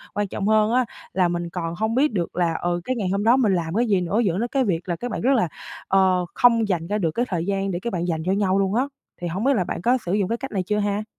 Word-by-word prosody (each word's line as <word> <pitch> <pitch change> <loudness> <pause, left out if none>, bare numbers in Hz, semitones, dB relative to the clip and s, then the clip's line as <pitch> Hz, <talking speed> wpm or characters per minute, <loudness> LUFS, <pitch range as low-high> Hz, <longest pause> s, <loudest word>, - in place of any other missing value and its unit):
Quan 205 0 0
trọng 195 +1 -3
hơn 215 0 +3
á, 255 0 +3 0.3
là 185 -2 +3
mình 175 0 -3
còn 170 -1 -4
hông 220 +2 -1
biết 275 -1 +2
được 175 -4 -2
là, 175 -2 +1
ừ, 175 0 -1
cái 255 - -1
ngày 205 -6 -2
hôm 200 +1 0
đó 235 +4 +5
mình 220 -7 +3
làm 170 -1 -2
cái 235 +3 +2
gì 195 -4 +2
nữa, 180 +5 0
dẫn 195 -6 +1
đến 235 - 0
cái 270 +2 +1
việc 180 -5 -2
là 175 - 0
các 245 +7 -5
bạn - - -3
rất 265 +4 +3
là, 225 -8 +2 0.4
ờ, 185 -2 +3
không 230 -3 +4
dành 170 -4 -1
ra 205 +3 0
được 170 -6 0
cái 240 +9 0
thời 170 -3 -1
gian 195 0 -1
để 175 - -2
các 235 - -4
bạn 175 -1 -1
dành 160 -2 -2
cho 185 - +1
nhau 195 -1 +2
luôn 195 +1 +1
á. 250 - +3 0.4
Thì 175 - -2
hổng 180 +5 -3
biết 275 +2 +4
là 190 - +1
bạn 170 - -4
có 245 +6 +3
sử 175 - -1
dụng 200 -2 +1
cái 230 - 0
cách 270 +2 -7
này 190 -3 -1
chưa 210 +3 -1
ha? 205 0 -1
195 Hz, 315 wpm, -23 LUFS, 175-225 Hz, 0.4 s, đó